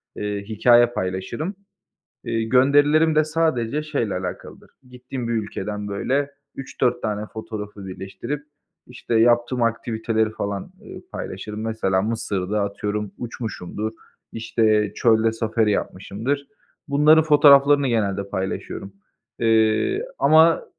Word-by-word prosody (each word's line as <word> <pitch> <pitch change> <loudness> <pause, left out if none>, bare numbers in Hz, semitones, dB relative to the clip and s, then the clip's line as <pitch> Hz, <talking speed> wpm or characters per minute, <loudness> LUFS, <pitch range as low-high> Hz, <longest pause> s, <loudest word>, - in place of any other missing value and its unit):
eee, 105 -1 -3
hikâye 120 +3 +5
paylaşırım. 105 - -4 0.7
Iıı, 115 -1 -1
gönderilerim 145 +5 +4
de 155 0 +4
sadece 150 -4 0
şeyle 120 -9 -2
alakalıdır, 90 -1 -7 0.2
gittiğim 125 -1 -6
bir - - -1
ülkeden 105 -1 -4
böyle 135 +8 -1 0.3
3-4 125 -2 -1
tane 105 0 -2
fotoğrafı 105 -3 -8
birleştirip, 95 +10 -6 0.4
işte 120 -1 -5
yaptığım 120 +2 +3
aktiviteleri 115 -1 0
falan, 100 -2 -5
ııı, - - -10
paylaşırım. 105 0 -6
Mesela 110 -4 0
Mısır'da 105 -2 -2
atıyorum 105 0 -3
uçmuşumdur, 110 -2 -5 0.4
işte 110 -2 +1
çölde 115 -1 +3
safari 110 -1 0
yapmışımdır. 115 +9 -3 0.4
Bunların 150 +3 +5
fotoğraflarını 145 -2 +6
genelde 100 -4 -1
paylaşıyorum, 95 0 -4 0.5
ııı, 110 - +2 0.2
ama 160 +1 +5
115 Hz, 105 wpm, -22 LUFS, 105-135 Hz, 0.7 s, fotoğraflarını